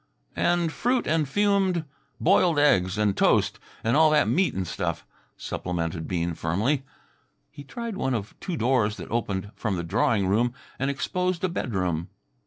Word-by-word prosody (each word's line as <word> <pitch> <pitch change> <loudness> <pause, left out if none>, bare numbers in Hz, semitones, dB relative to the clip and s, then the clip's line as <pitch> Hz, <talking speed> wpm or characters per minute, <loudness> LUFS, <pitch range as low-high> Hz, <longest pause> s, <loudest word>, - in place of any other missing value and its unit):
"And 175 -1 +1
fruit 245 +6 0
and 155 -2 +1
fumed... 195 -2 +2 0.3
boiled 175 -2 +4
eggs 95 -10 +3
and 105 -2 +2
toast - - +2 0.2
and 115 +3 +2
all 155 +1 +6
that 155 0 +3
meat 190 +1 +2
and 95 -1 -1
stuff," - - -3 0.3
supplemented 85 -2 -3
Bean 85 -1 -1
firmly. 105 - 0 0.7
He 145 - -10
tried 230 - -6
one 130 -7 0
of 105 -2 -4
two 180 -4 -4
doors 115 -4 +1
that - - -9
opened 100 -4 -2
from 105 -4 -2
the 85 - -3
drawing 100 +4 +1
room 115 +6 +1 0.2
and 135 +2 0
exposed 180 +6 -1
a 185 - +2
bedroom. 90 - -2
125 Hz, 160 wpm, -26 LUFS, -, 0.7 s, all